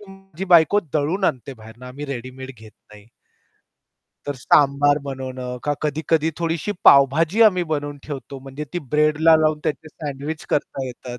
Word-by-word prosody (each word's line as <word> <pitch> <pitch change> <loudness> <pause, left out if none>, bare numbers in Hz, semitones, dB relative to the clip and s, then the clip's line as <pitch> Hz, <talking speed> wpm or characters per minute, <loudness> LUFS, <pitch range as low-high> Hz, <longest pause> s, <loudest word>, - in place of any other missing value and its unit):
ते - - -13
माझी 195 -2 -9
बायको 180 +2 +5
दळून 160 +6 0
आणते 130 -1 -1
बाहेरनं 110 +2 -13
आम्ही 135 +4 -8
रेडीमेड 130 0 -7
घेत 110 -1 -14 0.2
नाही. 105 0 -15 1.2
तर 145 - -3
सांबार 145 +3 +3
बनवणं 130 -2 -6
का 145 - +1
कधी-कधी 155 +1 0
थोडीशी 165 +4 -2
पावभाजी 155 - +5
आम्ही 185 -5 +4
बनवून 145 -1 -3
ठेवतो 140 -2 -7
म्हणजे 135 +3 -7
ती 175 - -2
ब्रेडला 155 +2 +4
लावून 155 -1 +1
त्याचे 155 +1 -3
सँडविच 150 +1 -6
करता 135 -2 -2
येतात. 125 0 -8
145 Hz, 150 wpm, -21 LUFS, 130-160 Hz, 1.2 s, बायको